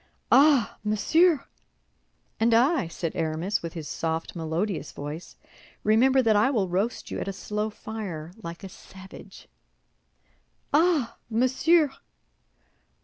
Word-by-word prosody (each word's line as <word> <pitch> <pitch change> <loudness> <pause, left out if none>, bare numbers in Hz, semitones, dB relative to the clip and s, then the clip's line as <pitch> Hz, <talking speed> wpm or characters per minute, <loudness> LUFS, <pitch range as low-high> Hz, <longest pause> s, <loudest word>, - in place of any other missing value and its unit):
"Ah, 275 -4 +5
monsieur!" 310 - +3 0.9
"And 225 +1 +3
I," 265 - +3
said 165 0 -5
Aramis, 165 +4 -1
with 170 -1 -6
his 160 -3 -6
soft, 165 +1 -3
melodius 165 +2 -3
voice, 150 +4 -7 0.5
"remember 255 +5 +4
that 220 -2 +3
I 210 +5 +4
will 215 -9 0
roast 195 +7 -2
you - - -3
at - - -4
a - - -1
slow 210 +2 -3
fire, 200 -8 -7
like 170 -1 -8
a 195 - -7
savage." 190 +1 -13 1.3
"Ah, 310 -5 +2
monsieur!" 265 +7 +3
210 Hz, 120 wpm, -26 LUFS, 170-255 Hz, 1.3 s, Ah